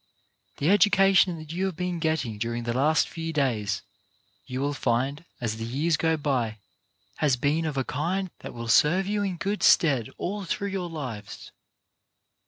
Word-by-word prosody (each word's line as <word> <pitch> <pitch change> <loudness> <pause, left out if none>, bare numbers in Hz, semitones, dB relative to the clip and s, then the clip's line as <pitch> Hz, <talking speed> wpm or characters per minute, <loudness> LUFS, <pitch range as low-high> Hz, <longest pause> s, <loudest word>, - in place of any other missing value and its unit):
The 150 +6 +2
education 195 -3 +5
that 155 0 -8
you 185 +3 -1
have 190 -3 -2
been 180 0 -2
getting 150 -10 -1
during 115 +1 -2
the 120 0 -2
last 150 +5 +3
few 165 0 -5
days, 110 -9 0 0.6
you 130 -1 -4
will 145 +1 0
find, 135 +5 -1
as 110 -2 -2
the 115 - -5
years 145 +8 0
go 160 +1 +1
by, 130 -7 -1 0.6
has 145 -4 +3
been 150 +6 +1
of 150 -3 -3
a 135 - +1
kind 175 +8 -2
that - - -9
will 115 0 -6
serve 165 +10 +4
you 205 +1 -1
in 190 -3 -2
good 200 +5 -2
stead 135 - +4
all 205 +3 -3
through 200 +2 -2
your 190 -3 -3
lives. 125 -10 -7
155 Hz, 175 wpm, -26 LUFS, 125-180 Hz, 0.6 s, education